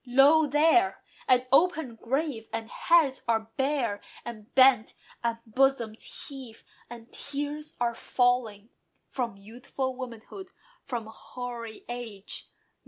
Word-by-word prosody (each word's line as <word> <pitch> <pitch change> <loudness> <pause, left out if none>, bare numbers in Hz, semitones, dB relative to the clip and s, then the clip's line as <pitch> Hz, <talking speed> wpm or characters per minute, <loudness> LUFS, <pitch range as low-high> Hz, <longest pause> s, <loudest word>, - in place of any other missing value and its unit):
Lo! 275 +5 +5
there, 325 +6 +4 0.3
an 255 0 +4
open 315 -4 +3
grave! 250 0 -2
and 225 0 -4
heads 315 -6 +3
are 225 -1 0
bare, 265 -7 0 0.2
And 225 0 -8
bent; 260 -4 +6 0.3
and 235 -1 0
bosoms 235 -2 0
heave, 260 -5 -10 0.3
and 235 -1 -11
tears 290 +2 -4
are 240 -1 +1
falling 235 -4 0 0.4
From 235 -6 -3
youthful 250 +5 -5
womanhood, 255 - -8 0.3
from 235 -3 -3
hoary 235 0 -8
age. 230 -5 -5
245 Hz, 110 wpm, -28 LUFS, 225-275 Hz, 0.4 s, bent